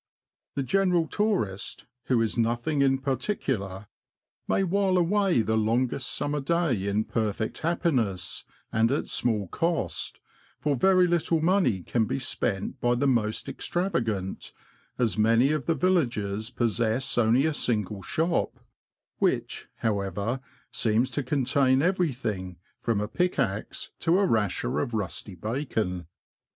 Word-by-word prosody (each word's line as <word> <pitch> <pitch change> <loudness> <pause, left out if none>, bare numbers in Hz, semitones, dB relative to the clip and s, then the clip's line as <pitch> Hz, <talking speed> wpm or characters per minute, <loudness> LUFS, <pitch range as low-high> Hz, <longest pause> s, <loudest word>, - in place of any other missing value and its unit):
The 140 - 0
general 180 +1 +2
tourist, 185 - -1 0.2
who 120 -3 +2
is 110 - -1
nothing 120 +5 0
in 135 -1 +4
particular, 130 - -2 0.6
may 195 - +2
while 190 0 +2
away 180 - +3
the 110 +1 0
longest 120 +4 +1
summer 145 0 -1
day 135 - 0
in 100 +2 +1
perfect 110 -1 -2
happiness, 125 - 0 0.3
and 115 +2 +2
at 140 - 0
small 110 -5 +1
cost, 165 - -1 0.4
for 145 -2 0
very 185 +6 +5
little 170 -1 +1
money 165 - +2
can 115 +3 +1
be - - -2
spent 120 -2 -2
by 120 0 +3
the 130 +4 0
most 115 -5 +1
extravagant, 115 - -2 0.4
as 115 -3 +1
many 115 +5 +4
of 155 -3 -2
the 165 - +2
villages 120 - 0
possess 115 0 0
only 120 +4 +4
a 160 - +1
single 105 -7 -1
shop, 165 - -1 0.6
which, - - 0
how 105 -3 +1
ever, 100 +6 -2 0.3
seems 115 +4 +1
to 145 - -1
contain 135 0 +2
everything, 120 - -1 0.2
from 115 -3 0
a 105 - -2
pickaxe 135 - -1
to 170 +2 +3
a 200 - +3
rasher 105 - 0
of 115 +9 -2
rusty 95 -1 -4
bacon. 105 - -2
120 Hz, 135 wpm, -27 LUFS, 105-160 Hz, 0.6 s, very